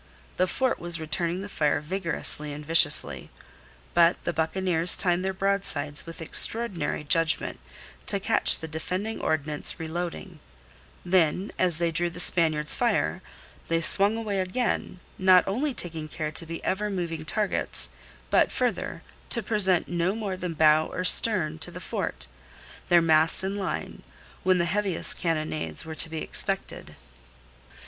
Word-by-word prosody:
The 185 - +2
fort 260 +5 0
was 175 -1 -4
returning 170 +3 -1
the - - -6
fire 150 -7 0
vigorously 160 -2 +1
and 150 +1 -8
viciously. 145 - +2 0.6
But 170 0 +4
the 170 - -2
buccaneers 170 +1 +3
timed 180 -1 +1
their 190 - 0
broadsides 190 -7 -1
with 165 0 -8
extraordinary 180 -5 0
judgment 165 +2 +1 0.5
to - - +2
catch - - +3
the 160 - -7
defending 185 +7 -4
ordnance 150 -1 -1
reloading; 170 +1 -5 0.7
then 180 +1 +2
as 180 -4 +2
they 170 0 0
drew 175 +2 0
the 170 - -9
Spaniards' 155 -4 +2
fire, - - 0 0.5
they 165 0 +1
swung 200 +6 +4
away 210 -4 -2
again 185 0 -2 0.2
not 185 -1 +5
only 260 +10 -1
taking 165 -9 -3
care 155 0 -4
to 165 +1 -2
be 165 0 -7
ever 210 +2 -1
moving 170 -5 -3
targets, 210 +5 -1 0.4
but, - - +4
further, - - -2 0.3
to 235 - +1
present 190 -5 +2
no 175 +3 -1
more 205 -4 -3
than 180 -2 -5
bow 155 0 +4
or 180 - -4
stern 180 -6 +2
to 145 - -2
the - - -9
fort, - - -4 0.6
their 175 -1 +5
masts 160 +2 +3
in 195 +1 -2
line, 195 -2 -4 0.4
when 185 0 +3
the 170 - +1
heaviest 195 0 +1
cannonades 155 -2 -2
were 160 - -6
to 165 +1 -2
be 160 -1 -4
expected. - - -4
170 Hz, 150 wpm, -26 LUFS, 160-190 Hz, 0.7 s, not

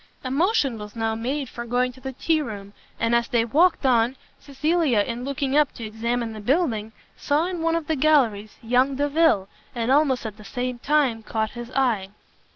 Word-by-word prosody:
A 255 - -4
motion 285 - +1
was 210 +1 -9
now 225 -1 -1
made 260 +5 -3
for 235 +1 -7
going 245 +1 0
to 260 - -17
the 265 - -5
tea 315 +4 +1
room; 205 -6 -7 0.3
and 230 +1 +1
as 235 0 +2
they 230 -1 +1
walked 325 +6 +3
on, 245 0 +3 0.2
Cecilia, 290 -4 +1
in 235 +4 -4
looking 275 0 -2
up 300 -2 +4
to 230 - -9
examine 230 +1 -2
the 215 - -8
building, 225 - 0 0.2
saw 295 +3 0
in 360 -2 -4
one 330 0 +1
of 335 -2 -2
the 320 - 0
galleries 255 -8 +2
young 250 +4 +2
Delvile, 290 -7 +2 0.3
and 235 +1 0
almost 275 -4 +3
at 215 -1 -6
the 215 - -13
same 245 +4 -4
time 275 -5 +1
caught 220 0 -2
his 240 -1 -8
eye. 230 -8 +1
250 Hz, 195 wpm, -24 LUFS, 225-290 Hz, 0.3 s, up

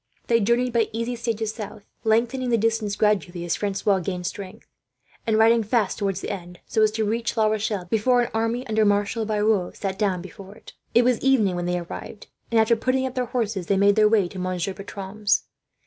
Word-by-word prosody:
They 230 -1 +3
journeyed 235 +3 +1
by 230 -2 +2
easy 230 +2 -2
stages 225 -2 -2
south, 215 -2 -8 0.2
lengthening 240 +3 +1
the 235 - +3
distances 220 -2 0
gradually 190 -5 0
as 170 - 0
Francois 200 -1 0
gained 180 0 -4
strength; 195 0 -7 0.6
and 220 -1 +3
riding 225 +1 +5
fast, 215 -2 0
towards 195 -2 -1
the - - -4
end, 180 -2 -7
so 220 - 0
as 215 - +5
to 220 0 0
reach 230 +2 -2
La 220 - +4
Rochelle 215 -3 -1
before 225 +6 +2
an - - -5
army, 230 +3 -1
under 220 -2 +1
Marshal 205 +2 +1
Biron, 210 -3 +1
sat 195 -1 -4
down 190 -4 0
before 195 +1 -11
it. - - -14 0.2
It 240 - +6
was 245 -2 +2
evening 230 -9 +3
when 175 0 -2
they 180 0 0
arrived, 175 +4 -8 0.2
and 230 - +3
after 220 +1 +4
putting 255 +3 0
up 260 - -4
their 255 -1 -1
horses 220 -7 -2
they 200 - +2
made 200 +1 +4
their 215 -1 +5
way 210 -4 +3
to 185 - -8
Monsieur 185 +1 -2
Bertram's. 200 +1 -2
215 Hz, 210 wpm, -24 LUFS, 195-230 Hz, 0.6 s, It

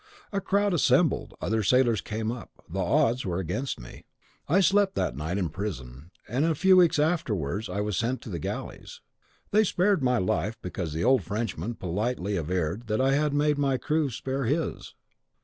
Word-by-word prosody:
A 200 - 0
crowd 200 +1 +1
assembled; 170 -1 +2
other 110 +3 0
sailors 120 -2 +3
came 110 +5 -3
up: 120 0 -7 0.2
the 95 +4 -5
odds 115 +7 +2
were 90 -2 -2
against 95 - -3
me. - - -11 0.5
I 175 +6 +4
slept 195 +1 +3
that - - -1
night 80 +6 -3
in 90 -4 -1
prison; 75 -6 -6 0.2
and 125 +6 0
in 165 - +3
a 160 - +1
few 190 +5 +5
weeks 175 -4 +5
afterwards 110 - 0
I 100 +3 -2
was 105 -1 -2
sent 120 +5 0
to - - -8
the 85 - -3
galleys. - - -6 0.5
They 215 +1 +5
spared 190 -2 +2
my 125 -1 +2
life, 95 +2 -1
because 90 -3 -4
the 80 - -2
old 130 -1 +4
Frenchman 105 +2 -3
politely 100 +2 -2
averred 90 +5 -2
that 110 0 0
I 135 +1 +3
had 150 +1 +2
made 145 0 +1
my 135 -2 +2
crew 155 +1 0
spare 135 +2 -3
his. 150 +6 -2
115 Hz, 185 wpm, -27 LUFS, 90-150 Hz, 0.5 s, few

